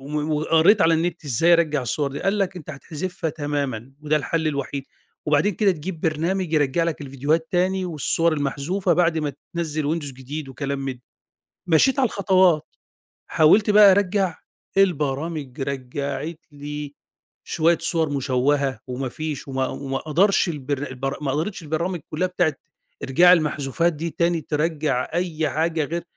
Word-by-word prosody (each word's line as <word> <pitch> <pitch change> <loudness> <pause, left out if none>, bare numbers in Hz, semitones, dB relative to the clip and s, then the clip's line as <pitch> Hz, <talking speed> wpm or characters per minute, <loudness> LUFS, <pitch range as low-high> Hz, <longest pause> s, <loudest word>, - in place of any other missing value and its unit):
و 150 +1 -1
وقريت 165 +7 +4
على 165 0 +5
النت، 165 0 -1
إزاي 155 +6 +3
أرجّع 155 -4 +2
الصور 140 +3 -1
دي 140 - -5
قال 195 +2 +1
لك 195 -2 -1
أنت 160 -3 -11
هتحذفها 160 +3 -4
تمامًا، 140 -5 -3
وده 150 0 +1
الحل 160 +1 0
الوحيد 140 -1 -3 0.4
وبعدين 150 +7 +2
كده 205 0 +3
تجيب 170 0 -6
برنامج 165 +2 -1
يرجّع 150 +2 +2
لك 165 -2 -2
الفيديوهات 145 +4 -1
تاني، 185 +1 +1
والصور 165 0 +1
المحذوفة، 155 +6 0
بعد 170 -2 +2
ما 150 -2 -2 0.2
تنزّل 155 -3 -2
ويندوز 150 -2 -2
جديد 135 +3 -7
وكلام 140 +1 -4
من 135 -1 -3
ده، 125 - -20 0.7
مشيت 255 - +3
على 260 - +4
الخطوات، 185 -6 +3 0.6
حاولت 200 +8 +4
بقى 205 -1 +8
أرجّع 190 -2 +1 0.4
البرامج 150 -6 0
رجّعت 140 +4 -4
لي 145 0 -7 0.5
شوية 165 +1 +2
صور 160 -3 0
مشوّهة، 135 -1 0
وما 125 +1 -3
فيش 150 +1 -5
وما 130 -1 -1
وما 135 -1 -4
قدرش 175 +5 +2
البر 145 -2 -3
البر 135 +1 -4
ما 135 - 0
قدرتش 170 +5 -3
البرامج 170 +3 -2
كلّها 180 +4 0
بتاعة 175 -4 +1 0.5
إرجاع 175 +7 +6
المحذوفات 155 0 +1
دي 165 +3 -4
تاني، 170 +1 0
ترجّع 150 -3 -1
أي 165 -3 -1
حاجة 160 0 0
غير 170 +3 -4
155 Hz, 150 wpm, -23 LUFS, 140-170 Hz, 0.7 s, بقى